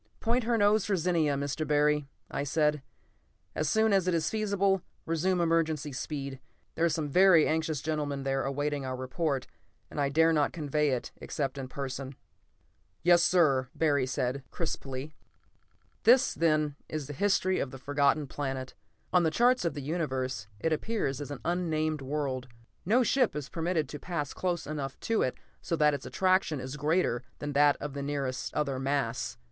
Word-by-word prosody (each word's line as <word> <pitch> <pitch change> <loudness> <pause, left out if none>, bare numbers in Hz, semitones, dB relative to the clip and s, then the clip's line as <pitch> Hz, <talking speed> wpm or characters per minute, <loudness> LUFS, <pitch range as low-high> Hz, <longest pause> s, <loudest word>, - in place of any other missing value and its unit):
"Point 235 +1 +1
her 235 0 +2
nose 205 0 +4
for 200 - +1
Zenia, 165 -4 +1
Mr. 140 +2 -2
Barry," 150 0 +2 0.2
I - - -2
said. 150 +1 +1 0.7
"As 155 -1 -1
soon 220 -1 +3
as 190 -2 +3
it 180 - +2
is 155 -1 0
feasible, 200 -3 +1 0.2
resume 175 +3 +1
emergency 160 -3 +1
speed. 140 0 -5 0.3
There 165 - -2
are 170 - +5
some 155 -1 -1
very 180 +1 +6
anxious 160 -2 0
gentlemen 145 -3 -2
there 135 0 0
awaiting 145 +1 -1
our 130 -1 -3
report, 130 +1 -2 0.5
and 145 - -2
I 140 - +2
dare 160 +3 +4
not 150 -2 +2
convey 150 -1 0
it 125 -3 -2
except 135 0 -3
in 130 - -5
person." 135 0 -5 0.9
"Yes, 175 0 +6
sir!" 155 -8 +4
said - - -25
Barry 145 -5 +2 0.4
crisply. 140 -3 -4 0.9
This, 255 +3 +5
then, 155 -3 +1
is 155 -2 -3
the 145 - -7
history 190 +2 +1
of 140 - -1
the 135 - -9
Forgotten 145 +2 +1
Planet. 135 -2 -4 0.4
On 180 - +6
the 165 - +3
charts 245 +5 +3
of 165 - -1
the 145 - -5
Universe 130 - -2
it 160 +8 +1
appears 155 - -2
as 145 - -6
an 145 - -6
unnamed 155 -3 0
world. 135 -2 -2 0.4
No 245 +6 +4
ship 250 - +2
is 145 -2 -4
permitted 165 -2 -1
to 150 - -6
pass 160 -5 -3
close 175 -2 -2
enough 145 -3 -5
to 225 -1 +1
it 130 - 0 0.2
so 165 - -1
that 150 -2 +4
its 140 - -4
attraction 185 -5 +2
is 130 +2 -6
greater 150 -4 +1 0.2
than 145 0 -4
that 145 0 +5
of 145 -1 -5
the 140 - -4
nearest 140 -2 -3
other 140 -3 0
mass. 135 -3 -1
150 Hz, 175 wpm, -29 LUFS, 140-170 Hz, 0.9 s, very